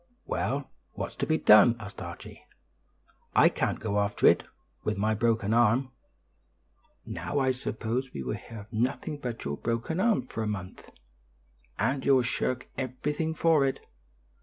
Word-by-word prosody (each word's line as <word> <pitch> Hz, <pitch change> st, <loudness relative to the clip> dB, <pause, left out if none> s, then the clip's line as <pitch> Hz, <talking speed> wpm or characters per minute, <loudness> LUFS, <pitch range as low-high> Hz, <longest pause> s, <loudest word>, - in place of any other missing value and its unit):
"Well, -, -, -2 dB, 0.2 s
what's -, -, -5 dB
to -, -, -1 dB
be 160 Hz, -, +2 dB
done?" 115 Hz, -2 st, +7 dB
asked 100 Hz, -3 st, -9 dB
Archie. -, -, -9 dB, 0.9 s
"I -, -, +7 dB
can't -, -, -1 dB
go 105 Hz, -2 st, -1 dB
after 100 Hz, 0 st, 0 dB
it, -, -, +6 dB, 0.4 s
with 105 Hz, -1 st, -1 dB
my 110 Hz, +2 st, +1 dB
broken 110 Hz, -1 st, +1 dB
arm." 120 Hz, +3 st, +3 dB, 1.1 s
"Now 145 Hz, -, -4 dB
I 130 Hz, -2 st, +3 dB
suppose 125 Hz, 0 st, -3 dB
we 65 Hz, -, -5 dB
will 65 Hz, -, -2 dB
hear 115 Hz, -2 st, -8 dB
of 105 Hz, +3 st, -16 dB
nothing 135 Hz, +6 st, -1 dB
but 120 Hz, -4 st, -5 dB
your 70 Hz, +1 st, -2 dB
broken 115 Hz, +9 st, -2 dB
arm 215 Hz, -, +3 dB
for 115 Hz, -2 st, -6 dB
a 110 Hz, -, -1 dB
month, 95 Hz, -3 st, -6 dB, 0.9 s
and 130 Hz, +5 st, 0 dB
you'll 135 Hz, -2 st, +4 dB
shirk 130 Hz, +1 st, -1 dB
everything 150 Hz, +5 st, -2 dB
for 160 Hz, -3 st, +4 dB
it. 135 Hz, -1 st, 0 dB
120 Hz, 155 wpm, -28 LUFS, 110-135 Hz, 1.1 s, done